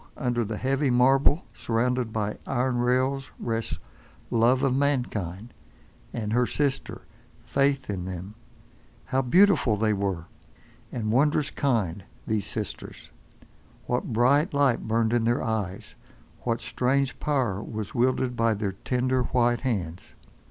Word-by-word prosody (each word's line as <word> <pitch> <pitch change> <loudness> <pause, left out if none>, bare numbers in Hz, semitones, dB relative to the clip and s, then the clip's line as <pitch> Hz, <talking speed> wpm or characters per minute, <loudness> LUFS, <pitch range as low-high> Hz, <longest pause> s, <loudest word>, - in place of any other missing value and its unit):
under 120 -2 0
the 110 0 -4
heavy 135 +3 +1
marble 135 +6 +4
surrounded 120 0 0
by 105 -1 -2
iron 130 -1 0
rails 130 +2 +1
rests 115 -1 -2 0.5
Love 120 +3 +3
of 135 -2 +2
mankind, 120 -7 -1 0.6
and 110 -2 -3
her 120 0 +3
sister 140 -2 -2 0.4
Faith 140 -1 +1
in 95 -4 -3
them. 95 +2 -6 0.7
How 130 +1 +1
beautiful 150 - +4
were 100 -5 0 0.7
they, - - -6
and 110 -2 -1
wondrous 145 +4 +2
kind—these 105 -3 -2
sisters. 110 -2 -6 0.7
What 125 0 -1
bright 140 - +3
light 140 -6 +2
burned 115 +1 +1
in 120 -1 +2
their 120 +1 +1
eyes, 105 -5 -3 0.5
what 115 -1 -2
strange 130 +4 0
power 125 -10 0
was 110 -2 -6
wielded 125 0 +1
by 115 -1 +2
their 100 -1 -2
tender, 130 +5 0
white 120 -1 +2
hands! 95 -9 -3
120 Hz, 125 wpm, -26 LUFS, 110-130 Hz, 0.7 s, marble